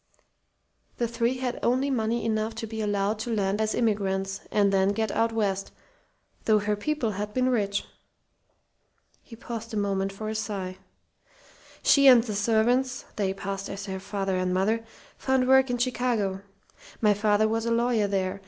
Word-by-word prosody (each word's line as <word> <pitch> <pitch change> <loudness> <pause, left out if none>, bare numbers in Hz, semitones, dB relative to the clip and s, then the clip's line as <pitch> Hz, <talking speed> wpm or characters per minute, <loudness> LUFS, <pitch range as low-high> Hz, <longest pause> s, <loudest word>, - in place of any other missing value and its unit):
The 240 - 0
three 235 +2 0
had 255 -1 -3
only 260 +3 +1
money 230 -1 0
enough 220 0 -1
to 225 - -4
be 220 0 -5
allowed 205 0 0
to 235 +2 -3
land 200 0 0
as 215 0 0
immigrants, 195 -4 0
and 200 -1 +2
to 195 0 +3
get 220 -2 -1
out 230 0 +1
west 200 -3 -1 0.7
though 215 -1 +5
her 210 0 0
people 245 +1 -1
had 210 +1 -5
been 255 0 +2
rich." 200 -5 0 1.4
He 230 - -13
paused 230 0 -7
a - - -1
moment 195 -1 0
for 215 +2 -6
a 215 - -2
sigh. 200 -4 -4 1.0
"She 280 -1 +6
and 245 -3 +8
the 220 -3 -4
servants 235 +5 +1
they 200 -3 0
passed 195 0 -5
as 195 0 -6
her 190 -2 -4
father 195 -1 -2
and 185 0 0
mother 210 +5 +1 0.4
found 265 -1 +1
work 265 0 +5
in 245 - 0
Chicago. 240 -6 0 0.6
My 210 -2 +4
father 210 +1 +2
was 225 +1 -1
a - - 0
lawyer 230 -2 +2
there. 195 -1 -1
215 Hz, 170 wpm, -26 LUFS, 200-235 Hz, 1.4 s, and